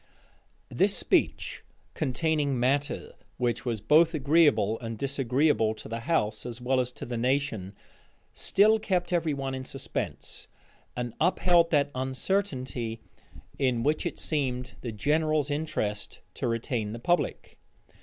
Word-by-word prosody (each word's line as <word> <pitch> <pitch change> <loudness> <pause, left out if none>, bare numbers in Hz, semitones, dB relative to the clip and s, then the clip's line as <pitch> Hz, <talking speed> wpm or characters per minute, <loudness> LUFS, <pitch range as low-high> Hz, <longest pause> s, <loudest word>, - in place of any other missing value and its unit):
This - - +2
speech, - - 0 0.3
containing 145 -1 0
matter 140 +4 0 0.2
which 120 -2 -1
was 115 -4 -2
both 160 - +5
agreeable 140 -8 +3
and 115 -1 -5
disagreeable 135 -2 +1
to 105 - -10
the 115 +1 -4
house, 115 -5 0
as 120 -1 -6
well 130 +1 +1
as 125 0 0
to - - -7
the 120 -1 -3
nation, 120 -7 -1 0.6
still 215 +2 +4
kept 185 -4 -1
every 160 -4 +1
one 135 -1 -3
in 130 0 -4
suspense, 135 +1 -4 0.5
and 120 -2 -3
upheld 175 0 +4
that 145 -3 +2
uncertainty 130 - -2 0.6
in 125 -4 +1
which 150 +2 +1
it - - -6
seemed 130 -4 -2
the 120 - -4
general's 150 +5 +1
interest 125 -9 -3
to - - -3
retain 115 -2 -2
the 120 - -6
public. 175 +8 -1
130 Hz, 135 wpm, -28 LUFS, 120-155 Hz, 0.6 s, both